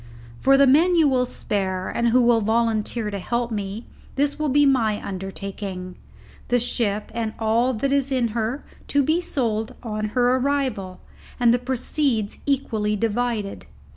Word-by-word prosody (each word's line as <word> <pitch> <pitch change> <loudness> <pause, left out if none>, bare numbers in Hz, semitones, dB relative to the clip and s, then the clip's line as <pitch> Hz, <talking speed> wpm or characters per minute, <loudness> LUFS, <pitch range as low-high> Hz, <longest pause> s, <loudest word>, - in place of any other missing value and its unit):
For 275 0 +5
the 280 - +6
men 320 +7 +5
you 320 -3 +5
will 255 -2 +2
spare, 190 -5 -2
and 235 - 0
who 245 +2 +4
will 235 -1 +4
volunteer 220 0 0
to 200 - -4
help 235 +4 -2
me, 205 +1 -4 0.3
this 285 +2 0
will 305 -1 0
be 290 +2 +4
my 230 -6 +2
undertaking: 190 -1 -6 0.5
the 245 - +3
ship 220 -3 -1
and 225 -2 -2
all 230 +3 +1
that 270 +5 -1
is 280 -1 +1
in 250 -3 +1
her 230 +5 -2 0.2
to 285 0 +2
be 315 +5 +1
sold 225 -10 -2
on 215 -2 -3
her 250 +1 +4
arrival, 255 -9 -2 0.4
and 240 -1 +5
the 245 - +2
proceeds 250 -3 -1
equally 220 -7 0
divided. 225 -1 -2
235 Hz, 160 wpm, -23 LUFS, 210-265 Hz, 0.5 s, the